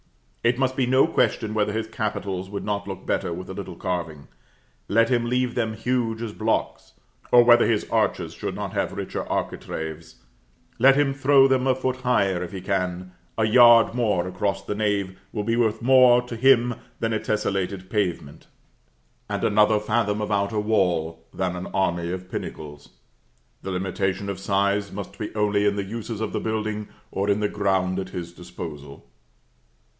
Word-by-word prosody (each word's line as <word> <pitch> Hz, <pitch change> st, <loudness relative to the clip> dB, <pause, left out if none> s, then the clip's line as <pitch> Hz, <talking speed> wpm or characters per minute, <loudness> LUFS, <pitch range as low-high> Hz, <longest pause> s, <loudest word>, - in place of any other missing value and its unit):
It 120 Hz, +1 st, +2 dB
must 130 Hz, -1 st, 0 dB
be 130 Hz, -2 st, +1 dB
no 130 Hz, +2 st, +5 dB
question 110 Hz, -2 st, 0 dB
whether 105 Hz, -1 st, +1 dB
his 110 Hz, +1 st, -2 dB
capitals 100 Hz, -4 st, -3 dB
would 100 Hz, 0 st, -5 dB
not 100 Hz, -1 st, -2 dB
look 95 Hz, -2 st, -7 dB
better -, -, -1 dB
with 90 Hz, +3 st, -6 dB
a -, -, -5 dB
little 95 Hz, -2 st, -7 dB
carving 85 Hz, -5 st, -4 dB, 0.6 s
let 115 Hz, +2 st, +3 dB
him 120 Hz, -2 st, +1 dB
leave 125 Hz, 0 st, 0 dB
them 110 Hz, -2 st, -1 dB
huge 115 Hz, 0 st, -1 dB
as 110 Hz, -2 st, -5 dB
blocks; 110 Hz, +1 st, -2 dB, 0.4 s
or 120 Hz, 0 st, +8 dB
whether 120 Hz, 0 st, +6 dB
his 110 Hz, -3 st, 0 dB
arches -, -, 0 dB
should -, -, -5 dB
not -, -, -5 dB
have -, -, -1 dB
richer -, -, -4 dB
architraves 80 Hz, 0 st, -4 dB, 0.6 s
let 135 Hz, +3 st, +6 dB
him 140 Hz, -1 st, +2 dB
throw 135 Hz, 0 st, +5 dB
them 130 Hz, -1 st, +1 dB
a 130 Hz, -, +3 dB
foot 130 Hz, 0 st, -2 dB
higher, 100 Hz, -8 st, +1 dB
if 90 Hz, -, -5 dB
he 95 Hz, -2 st, -6 dB
can; 90 Hz, -1 st, -2 dB, 0.3 s
a 110 Hz, -, +2 dB
yard 120 Hz, 0 st, +7 dB
more 105 Hz, -7 st, 0 dB
across 95 Hz, +2 st, -2 dB
the -, -, -2 dB
nave 100 Hz, -3 st, -1 dB
will 105 Hz, -, -3 dB
be 115 Hz, +2 st, 0 dB
worth 115 Hz, -1 st, 0 dB
more 125 Hz, -1 st, +6 dB
to 125 Hz, -1 st, -7 dB
him 125 Hz, 0 st, +4 dB, 0.3 s
than 115 Hz, 0 st, -1 dB
a 110 Hz, -, 0 dB
tesselated 100 Hz, -3 st, -2 dB
pavement; 90 Hz, -9 st, -2 dB, 0.8 s
and -, -, -3 dB
another 105 Hz, +1 st, +4 dB
fathom 105 Hz, -1 st, 0 dB
of 105 Hz, 0 st, -3 dB
outer 100 Hz, +1 st, 0 dB
wall, 90 Hz, -7 st, 0 dB
than 90 Hz, -2 st, -2 dB
an 90 Hz, +1 st, -5 dB
army 85 Hz, -3 st, -1 dB
of 90 Hz, 0 st, -6 dB
pinnacles. 75 Hz, -4 st, -7 dB, 0.7 s
The -, -, -6 dB
limitation 95 Hz, +1 st, -2 dB
of 95 Hz, -2 st, -4 dB
size 100 Hz, +1 st, 0 dB
must 100 Hz, -1 st, -8 dB
be 105 Hz, -, -4 dB
only 105 Hz, -1 st, +2 dB
in 100 Hz, -, +1 dB
the 100 Hz, -, -2 dB
uses 115 Hz, +1 st, -5 dB
of 110 Hz, -, -3 dB
the -, -, -1 dB
building, 110 Hz, -1 st, -3 dB, 0.2 s
or 100 Hz, +1 st, -1 dB
in 100 Hz, +1 st, +2 dB
the 105 Hz, -, +2 dB
ground 95 Hz, -2 st, 0 dB
at 95 Hz, -1 st, -5 dB
his 85 Hz, -2 st, -6 dB
disposal. 80 Hz, -7 st, -9 dB
105 Hz, 180 wpm, -24 LUFS, 95-115 Hz, 0.8 s, or